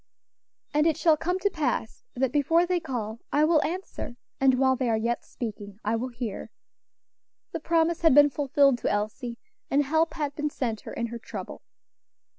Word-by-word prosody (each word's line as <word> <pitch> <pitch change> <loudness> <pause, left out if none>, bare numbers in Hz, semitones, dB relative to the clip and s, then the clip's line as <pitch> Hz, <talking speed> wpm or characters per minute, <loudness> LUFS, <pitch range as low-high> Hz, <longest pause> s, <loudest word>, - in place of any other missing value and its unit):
"And 300 +2 +3
it 320 - +2
shall 320 -2 +4
come 355 +4 -1
to 405 +2 +1
pass, 265 - -2
that 255 0 +1
before 325 +5 +3
they 360 0 +1
call, 235 -8 -4
I 295 +1 +4
will 315 -1 +4
answer, 350 -7 -5 0.2
and 265 -1 +5
while 260 0 +3
they 255 -1 -1
are 225 - +2
yet 235 +2 -1
speaking, 205 -4 -7
I 215 +2 +1
will 235 +3 -2
hear." 235 -4 -5 1.0
The - - -3
promise 330 +1 +1
had 325 -5 +5
been 290 0 +7
fulfilled 275 -1 +3
to - - -1
Elsie, 215 +4 -2 0.3
and 285 +1 +3
help 320 +4 +1
had 295 -3 -2
been 300 0 -2
sent 230 -7 -3
her - - -9
in 235 - -2
her 235 - -5
trouble. - - -8
275 Hz, 185 wpm, -27 LUFS, 235-315 Hz, 1.0 s, been